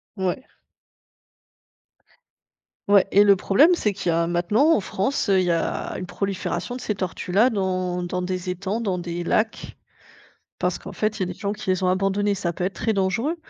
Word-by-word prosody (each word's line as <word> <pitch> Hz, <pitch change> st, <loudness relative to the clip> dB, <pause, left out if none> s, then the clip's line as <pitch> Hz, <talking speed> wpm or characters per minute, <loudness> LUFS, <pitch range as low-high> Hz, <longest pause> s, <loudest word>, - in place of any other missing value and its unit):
Ouais. 190 Hz, +5 st, -2 dB, 2.4 s
Ouais 200 Hz, -2 st, +5 dB
et 205 Hz, -, +6 dB
le 200 Hz, -1 st, +6 dB
problème, 260 Hz, -, +4 dB
c'est 220 Hz, -11 st, +1 dB
qu'il 190 Hz, -2 st, -3 dB
y 165 Hz, -, +2 dB
a 165 Hz, 0 st, +1 dB
maintenant 190 Hz, -, +2 dB
en -, -, +3 dB
France, 200 Hz, +6 st, -1 dB
il 195 Hz, -2 st, +4 dB
y 175 Hz, -1 st, +1 dB
a 165 Hz, -1 st, -2 dB
une 185 Hz, -, -5 dB
prolifération 200 Hz, +6 st, -3 dB
de 255 Hz, -, -9 dB
ces 210 Hz, -, -2 dB
tortues-là 190 Hz, +4 st, +1 dB
dans 185 Hz, -4 st, -1 dB
dans 180 Hz, +1 st, -3 dB
des 185 Hz, 0 st, -3 dB
étangs, 190 Hz, +4 st, -2 dB
dans 200 Hz, -6 st, -1 dB
des 175 Hz, 0 st, -4 dB
lacs 220 Hz, +5 st, -1 dB, 0.8 s
parce -, -, -1 dB
qu'en -, -, -9 dB
fait, 215 Hz, 0 st, -1 dB
il -, -, -13 dB
y -, -, +2 dB
a -, -, -5 dB
des 180 Hz, -, -5 dB
gens 200 Hz, 0 st, -2 dB
qui 210 Hz, -2 st, -8 dB
les 185 Hz, 0 st, 0 dB
ont 185 Hz, -, +2 dB
abandonnées. 195 Hz, +2 st, +1 dB
Ça 185 Hz, -3 st, -2 dB
peut 180 Hz, -, -3 dB
être 190 Hz, -, -1 dB
très 225 Hz, -, -1 dB
dangereux, 200 Hz, -, 0 dB
190 Hz, 195 wpm, -23 LUFS, 180-210 Hz, 2.4 s, et